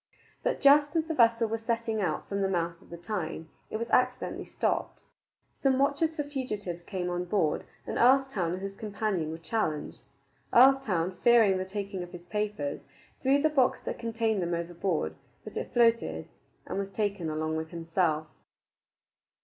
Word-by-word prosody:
But - - 0
just 290 +2 +6
as 320 -1 +2
the 325 - -2
vessel 230 -3 +4
was 225 +1 -3
setting 230 -1 -1
out 190 - -1
from 200 0 -2
the 195 - +1
mouth 170 -2 -1
of - - -20
the 170 - -8
Tyne, 170 -3 -4 0.2
it - - -3
was 230 +1 -4
accidentally 255 0 +1
stopped. - - -2 0.5
Some 265 -2 +1
watchers 285 +4 +1
for 295 - -1
fugitives 210 -11 -4
came 180 0 -4
on 175 0 -2
board, 175 -5 0 0.2
and - - -3
Earlstoun 250 -9 +3
and 185 - -5
his 195 0 -4
companion 205 -6 -2
were 160 - -5
challenged. 165 -3 -2 0.5
Earlstoun, 230 -9 +4
fearing 225 -6 +5
the 185 - -2
taking 200 -1 -4
of 175 +1 -8
his 175 -1 -9
papers, 210 -7 -2 0.4
threw 275 +2 +3
the 310 - +5
box 270 -5 +2
that - - -5
contained 225 -3 0
them 170 0 -1
overboard; 170 - -2 0.3
but - - -10
it - - -4
floated, 235 -1 +2 0.4
and - - -3
was 200 0 -3
taken 200 -4 -2
along 155 +1 -2
with 160 0 -3
himself. 165 -2 0
205 Hz, 170 wpm, -29 LUFS, 175-240 Hz, 0.5 s, just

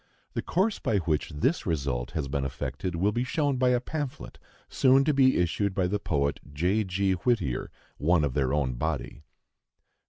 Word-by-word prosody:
The - - -1
course 195 +5 0
by 105 - +1
which 80 -5 0
this 105 - 0
result 70 -7 -1
has 75 -3 -2
been 70 0 -2
effected 70 +7 -4
will 95 +5 +2
be 120 +3 -1
shown 140 +1 0
by 125 0 +3
a 125 -1 +3
pamphlet 145 +1 -5 0.3
soon 135 +1 +4
to 150 +1 +2
be 130 -1 +4
issued 95 +3 0
by 95 - +1
the 100 +3 0
poet 70 -6 0
J. 90 +9 +1
G. 95 0 0
Whittier, 95 - 0 0.3
one 85 +1 +3
of 70 -3 0
their 65 -2 +1
own 70 -3 0
body. 75 +2 -3
90 Hz, 180 wpm, -27 LUFS, -, 0.3 s, soon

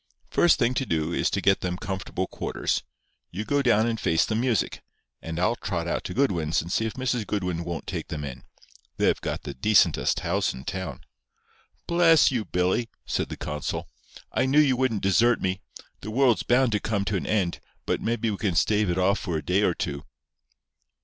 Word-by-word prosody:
First 175 - +4
thing 120 -1 +2
to 135 - -1
do 80 0 -1
is - - +1
to 100 - -1
get 95 0 +3
them 90 -1 -2
comfortable 95 -1 -3
quarters. - - -2 0.5
You 105 +5 -5
go 145 +3 +1
down 115 -4 +3
and 115 -1 -1
face 80 -5 +2
the - - -2
music, 115 -1 0 0.4
and 80 +1 -5
I'll 90 +6 +2
trot 85 -7 -3
out - - -1
to 90 - -5
Goodwin's 85 - +1
and 85 +2 -4
see 115 - +1
if 110 - -6
Mrs. 125 -4 -1
Goodwin 90 -5 -2
won't 85 -2 -5
take - - -4
them 75 -1 -5
in. 65 -4 -7 0.5
They've - - +2
got - - -3
the - - -5
decentest 95 +2 +3
house - - 0
in 65 +1 -10
town." 95 -10 -5 0.8
"Bless 170 -3 +5
you, 120 -5 -1
Billy!" 90 +6 0 0.2
said - - -2
the - - -6
consul. 75 0 -4 0.4
"I - - +1
knew 140 +3 +4
you 140 -4 +4
wouldn't 125 -5 0
desert 115 +5 +4
me. 95 0 -2 0.4
The 105 - -7
world's 125 0 +3
bound 125 0 +3
to 105 - +1
come 100 -2 -1
to 100 +2 -1
an 85 -7 -2
end, 95 -5 0 0.3
but - - -1
maybe 115 -1 0
we 100 - -3
can 95 -5 -1
stave 105 +3 +2
it 85 - 0
off 95 +2 +2
for 85 -4 -2
a 75 - -6
day 95 +3 +2
or - - +2
two." 70 0 -4
100 Hz, 205 wpm, -26 LUFS, 85-120 Hz, 0.8 s, Bless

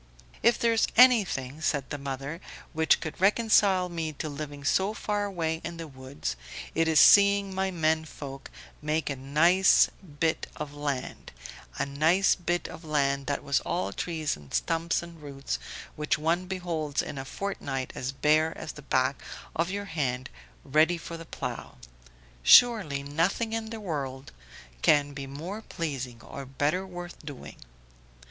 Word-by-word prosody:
"If 235 +1 +4
there 230 -1 +2
is 225 - +3
anything," 190 - +4
said 145 -4 -1
the 145 - -3
mother, 140 +4 -5 0.3
"which 160 0 +3
could 160 +2 -6
reconcile 200 -3 +4
me 165 -3 -4
to 155 +2 -5
living 145 -1 -7
so 190 +8 +1
far 205 -1 -1
away 165 -4 -2
in 170 0 -5
the 165 -1 -6
woods, 130 - -6 0.4
it 165 0 +2
is 160 -1 +5
seeing 200 0 +6
my 190 0 0
men 160 -3 +1
folk 135 -3 -9 0.3
make 155 0 -1
a - - -2
nice 160 +8 +4 0.3
bit 160 -1 +1
of 150 -1 -6
land 145 -3 -4 0.5
a - - 0
nice 160 +8 +3
bit 175 -1 -2
of 165 - -10
land 140 -3 0
that 145 - -2
was 140 -1 +2
all 95 +2 -2
trees 160 - -2
and 75 -2 -8
stumps 165 +1 0
and 170 -2 -12
roots, 135 - -4 0.4
which 150 0 0
one 170 +4 0
beholds 170 -6 -2
in 140 - -6
a - - -4
fortnight 135 -5 -4
as 130 +1 -3
bare 155 +3 +2
as 160 - -6
the 150 - -11
back 130 0 0 0.3
of 170 +2 0
your 200 +1 -3
hand, 130 -8 -2 0.3
ready 160 +5 +3
for 170 0 -7
the 165 0 -9
plough; 125 -6 -6 0.6
surely 160 - +6
nothing 170 +10 0
in 225 -1 -3
the 225 0 -6
world 140 -8 -5 0.5
can 145 - +3
be 140 -1 -6
more 170 +10 -6
pleasing 135 - -5
or 140 - -8
better 145 +8 -1
worth 175 -2 -9
doing." 145 -3 -9
155 Hz, 160 wpm, -28 LUFS, 140-180 Hz, 0.6 s, seeing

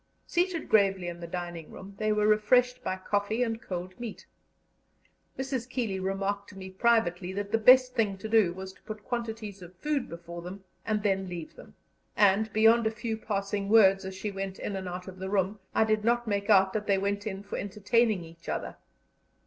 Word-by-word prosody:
Seated 350 -2 0
gravely 195 -4 +3
in 170 0 -6
the 170 - -7
dining 175 -2 -6
room, 195 +1 -10
they 215 0 +1
were 210 0 +2
refreshed 250 +4 +3
by 185 - -1
coffee 205 +5 0
and 225 -1 -3
cold 185 -1 -6
meat. 235 -4 -7 1.1
Mrs. 265 -2 -3
Keeley 225 -7 -2
remarked 195 +1 -2
to 195 - -13
me 190 0 -8
privately 190 -4 +1
that 200 +1 -4
the 225 - +2
best 255 +2 +7
thing 205 -4 0
to 190 - -6
do 215 -5 +4
was 190 +1 -8
to - - -24
put 215 -1 -8
quantities 225 -4 -4
of 180 +1 -12
food 290 +6 -2
before 170 0 -8
them 185 +3 -8 0.2
and 215 -2 0
then 195 -2 0
leave 170 -3 -7
them; - - -14 0.4
and, 205 +1 +4
beyond 225 +2 +5
a - - +3
few 220 +1 -4
passing 200 -2 -3
words 195 -3 +6
as 190 0 -6
she 205 +2 -4
went 195 -1 -5
in 200 - -4
and 190 -1 -4
out 180 +1 -6
of 185 0 -9
the 190 0 -4
room, 200 +1 0 0.2
I - - +5
did 215 -1 +1
not 240 +1 +2
make 200 0 -1
out 190 -2 +5
that 210 -1 -2
they 200 -1 +3
went 200 +2 -1
in 195 -1 -5
for 200 - -5
entertaining 210 0 +1
each 165 0 -12
other. - - -4
200 Hz, 205 wpm, -29 LUFS, 190-220 Hz, 1.1 s, best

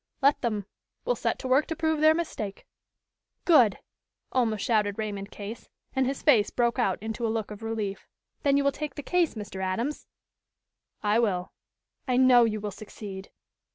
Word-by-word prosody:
"Let 280 +1 +3
them. 215 -5 -1 0.4
We'll - - +2
set - - -1
to - - -5
work 265 +4 +3
to 325 - -3
prove 315 -1 0
their 310 0 +6
mistake." 220 -12 -4 0.8
"Good!" 250 - +6 0.5
almost 225 -5 +1
shouted 210 -3 +1
Raymond 205 -2 -4
Case, 210 +3 -8 0.3
and 265 -1 +2
his 275 +1 -3
face 235 -9 +5
broke 240 +1 0
out 195 -6 +2
into 220 +1 -4
a 230 - +1
look 220 -1 -2
of 210 +1 -8
relief. 220 -3 -4 0.3
"Then 280 -2 +3
you 280 - +2
will 280 - +3
take 295 -1 -5
the 290 - -6
case, 350 -1 +1
Mr. 205 -3 -6
Adams?" 230 +11 -2 1.0
"I 210 +2 +3
will." 185 -6 0 0.5
"I 250 -1 +2
know 250 -2 +7
you 215 -1 -1
will 210 0 -4
succeed." 200 -1 -9
230 Hz, 175 wpm, -27 LUFS, 210-275 Hz, 1.0 s, know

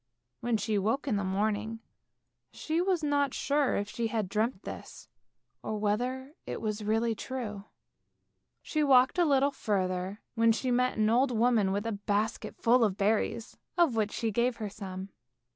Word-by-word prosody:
When 240 -2 0
she 215 -1 0
woke 225 +9 0
in 225 - +1
the 200 - -1
morning 210 +3 -1 0.7
she 320 +2 -1
was 365 -3 +1
not 285 -2 +1
sure 285 -1 +1
if 205 - -1
she 230 +2 -2
had 220 -4 -2
dreamt 215 0 -1
this, - - -9 0.5
or 215 - -3
whether 250 +7 -1
it - - -4
was 215 -1 -3
really 225 +2 +1
true. 215 -4 -5 1.0
She 305 -1 0
walked 265 +3 +5
a 350 - +5
little 280 -1 +3
further, 190 -3 -2
when 230 -1 +4
she 250 +2 -1
met 250 0 +1
an 215 0 +3
old 255 +4 +4
woman 230 -4 +2
with 200 +2 -1
a 230 - -1
basket 205 +2 -2
full 240 +1 +4
of 200 -3 +1
berries, 220 +3 0 0.2
of 335 -9 +4
which 215 -1 +1
she 225 -2 -1
gave 235 +3 +1
her 215 -3 -5
some. 190 -2 -7
225 Hz, 170 wpm, -30 LUFS, 205-255 Hz, 1.0 s, walked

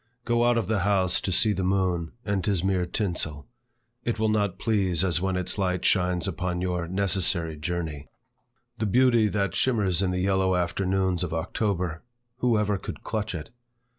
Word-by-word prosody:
Go 120 0 +2
out 120 0 +3
of 115 - 0
the 110 +1 0
house 95 -2 +2
to 95 - -2
see 105 +4 +3
the 95 - -2
moon, 90 -3 0
and 100 -2 0
't - - 0
is 95 -4 0
mere 95 -2 +1
tinsel; 85 -8 -2 0.6
it 120 - -1
will 110 0 +1
not 105 -3 0
please 95 -6 +1
as 85 -2 +1
when 95 -1 0
its 90 +2 -1
light 90 -2 0
shines 90 -1 +2
upon 90 -1 -2
your 90 -2 -2
necessary 90 -3 0
journey. 80 -2 -4 0.7
The 110 - 0
beauty 120 0 +4
that 100 -4 -1
shimmers 100 -8 +1
in 95 - +1
the 90 - -1
yellow 95 0 +2
afternoons 90 +1 0
of 85 -2 -3
October, 90 0 -2 0.4
who 125 -3 +2
ever 105 -2 0
could - - -8
clutch 110 -3 -3
it? 80 +6 -7
95 Hz, 180 wpm, -26 LUFS, 90-105 Hz, 0.7 s, beauty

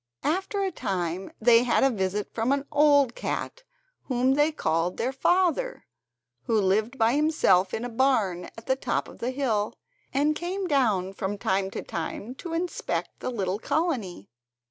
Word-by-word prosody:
After 385 +5 0
a 385 - -1
time 180 - -3
they 230 +1 +6
had 245 +1 +2
a 270 - +4
visit 200 -1 -2
from 230 +3 0
an 280 0 0
old 285 -4 +4
cat, - - -4 0.4
whom 255 0 +2
they 295 +3 +3
called 165 - -1
their 250 +3 0
father, 370 - +1 0.6
who 225 -2 +2
lived 215 +6 +1
by 225 0 +3
himself 280 - +3
in 230 - -3
a - - -2
barn 225 -8 +1
at 225 - -10
the 260 - +2
top 255 -2 -2
of - - -13
the 240 - -2
hill, 240 -6 -1 0.4
and 295 +3 +2
came 370 +4 -3
down 220 - +1
from 195 +1 -3
time 190 0 0
to - - -6
time 200 +8 -5
to 330 +5 -7
inspect 345 +1 -3
the - - -3
little 200 -5 -2
colony. 235 - -2
245 Hz, 165 wpm, -26 LUFS, 195-295 Hz, 0.6 s, they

